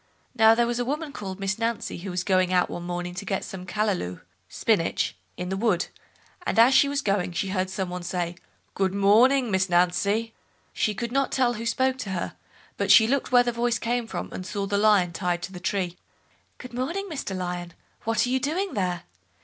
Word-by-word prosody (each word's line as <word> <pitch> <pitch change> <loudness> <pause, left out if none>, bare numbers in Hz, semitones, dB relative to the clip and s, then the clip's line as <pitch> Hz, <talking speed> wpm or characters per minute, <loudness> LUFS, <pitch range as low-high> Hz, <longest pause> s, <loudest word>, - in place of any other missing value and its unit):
Now 220 0 +6
there 235 +1 +3
was 240 0 -1
a - - +1
woman 295 +4 -3
called 190 -1 -6
Miss 195 +1 -2
Nancy, 230 -5 -2
who 190 +3 -6
was 180 0 -2
going 185 -2 +2
out 180 -1 +2
one - - -5
morning 175 0 -4
to 185 - -5
get 195 0 -2
some 185 -1 -8
"callalou" 190 - -1 0.3
(spinach) - - 0 0.2
in 180 0 -4
the 190 - -1
wood, 195 -5 +1 0.5
and - - -2
as 235 +4 +7
she 280 - +5
was 280 -1 -1
going, 195 -3 0
she 190 +2 -2
heard 185 -1 -1
some 190 -1 -3
one 180 0 -4
say, 175 -1 -2 0.4
"Good 190 -1 0
morning, 230 +5 +4
Miss 190 0 +1
Nancy!" 200 +6 +2 0.4
She 210 - 0
could 235 +2 -3
not 275 +1 +1
tell 250 -2 +2
who 230 +1 -4
spoke 260 +2 +1
to 220 -6 -4
her, 185 -3 -3 0.4
but - - -1
she 225 - +8
looked 265 +3 0
where 245 -1 +6
the 240 - 0
voice 235 0 0
came 240 0 -1
from, - - -5
and 185 - -5
saw 200 +1 -3
the 200 +1 -1
Lion 205 -5 +4
tied 175 0 -1
to 190 - -5
the 180 - -8
tree. 180 -2 -2 0.6
"Good 250 -2 -10
morning, 335 +11 -2
Mr 275 - -4
Lion, 175 -1 -4 0.3
what 225 0 +1
are - - -3
you 260 - +2
doing 350 +8 -1
there?" 180 -4 -1
205 Hz, 215 wpm, -26 LUFS, 180-240 Hz, 0.6 s, she